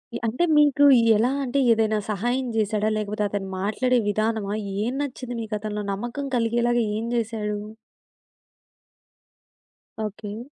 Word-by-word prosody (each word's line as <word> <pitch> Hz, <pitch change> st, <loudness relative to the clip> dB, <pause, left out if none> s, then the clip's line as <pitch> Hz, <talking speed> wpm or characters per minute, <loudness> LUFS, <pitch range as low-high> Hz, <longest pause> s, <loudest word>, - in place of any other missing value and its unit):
ఇ -, -, 0 dB
అంటే 245 Hz, +10 st, 0 dB
మీకు 290 Hz, -1 st, +4 dB, 0.3 s
ఎలా 230 Hz, +4 st, +2 dB
అంటే 265 Hz, +2 st, 0 dB
ఏదైనా 220 Hz, -1 st, +2 dB
సహాయం 240 Hz, +6 st, -1 dB
జేసాడా? 215 Hz, 0 st, +1 dB
లేకపోతే 210 Hz, 0 st, -2 dB
అతను 195 Hz, -1 st, -3 dB
మాట్లాడే 245 Hz, +6 st, +1 dB
విధానమా 215 Hz, -1 st, -1 dB, 0.3 s
ఏం 245 Hz, +3 st, -1 dB
నచ్చింది 255 Hz, -3 st, -5 dB
మీకు 220 Hz, -1 st, -6 dB
అతనిలో 210 Hz, 0 st, -4 dB
నమ్మకం 240 Hz, +8 st, -4 dB
కలిగేలాగా 240 Hz, +1 st, +1 dB, 0.2 s
ఏం 225 Hz, -, -3 dB
జేసాడు? 215 Hz, -2 st, -2 dB, 2.5 s
ఓకే. 210 Hz, +1 st, -8 dB
220 Hz, 120 wpm, -24 LUFS, 210-245 Hz, 2.5 s, మీకు